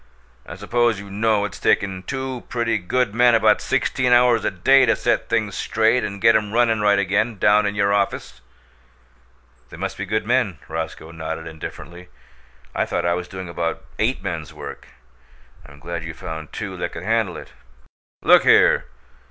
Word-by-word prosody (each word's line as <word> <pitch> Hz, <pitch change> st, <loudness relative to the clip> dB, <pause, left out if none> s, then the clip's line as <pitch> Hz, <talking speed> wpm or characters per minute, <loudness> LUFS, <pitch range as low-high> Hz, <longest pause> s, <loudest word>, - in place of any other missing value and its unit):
"I -, -, -8 dB
suppose 115 Hz, +2 st, 0 dB
you 100 Hz, -1 st, -10 dB
know 105 Hz, 0 st, +1 dB
it's 100 Hz, -, -7 dB
taken 95 Hz, -2 st, +1 dB
two 130 Hz, +4 st, -5 dB
pretty 115 Hz, -2 st, 0 dB
good 100 Hz, +4 st, -1 dB
men 120 Hz, 0 st, +4 dB
about 115 Hz, -, +3 dB
sixteen 125 Hz, -2 st, 0 dB
hours 120 Hz, -2 st, +4 dB
a -, -, +1 dB
day 130 Hz, +8 st, +4 dB
to 115 Hz, -, +3 dB
set -, -, -1 dB
things -, -, 0 dB
straight 115 Hz, +3 st, +1 dB
and 100 Hz, 0 st, -5 dB
get 115 Hz, +3 st, +5 dB
'em 105 Hz, -1 st, 0 dB
runnin' 115 Hz, -2 st, +2 dB
right 105 Hz, -1 st, +3 dB
again, 100 Hz, +3 st, 0 dB
down 105 Hz, +2 st, +3 dB
in 100 Hz, -, -3 dB
your 100 Hz, 0 st, +2 dB
office?" 100 Hz, -10 st, -2 dB, 1.3 s
"They -, -, -11 dB
must 95 Hz, +2 st, -5 dB
be 95 Hz, -, -4 dB
good 110 Hz, +2 st, -1 dB
men." 120 Hz, -7 st, +1 dB
Roscoe 80 Hz, 0 st, -6 dB
nodded 80 Hz, 0 st, -6 dB
indifferently. 85 Hz, +2 st, -9 dB, 0.6 s
"I -, -, 0 dB
thought 85 Hz, -, -2 dB
I 85 Hz, -, +2 dB
was 90 Hz, 0 st, -4 dB
doing 95 Hz, -1 st, -8 dB
about 85 Hz, -1 st, -4 dB
eight -, -, 0 dB
men's -, -, -5 dB
work. -, -, -9 dB, 0.8 s
I'm 75 Hz, -1 st, -15 dB
glad 85 Hz, +3 st, -6 dB
you 80 Hz, 0 st, -7 dB
found 80 Hz, -1 st, -7 dB
two 95 Hz, -4 st, -6 dB
that 85 Hz, 0 st, -4 dB
could 80 Hz, -, -7 dB
handle 110 Hz, -3 st, 0 dB
it." -, -, -11 dB, 0.7 s
"Look -, -, +7 dB
here! -, -, +4 dB
100 Hz, 175 wpm, -21 LUFS, 85-115 Hz, 1.3 s, Look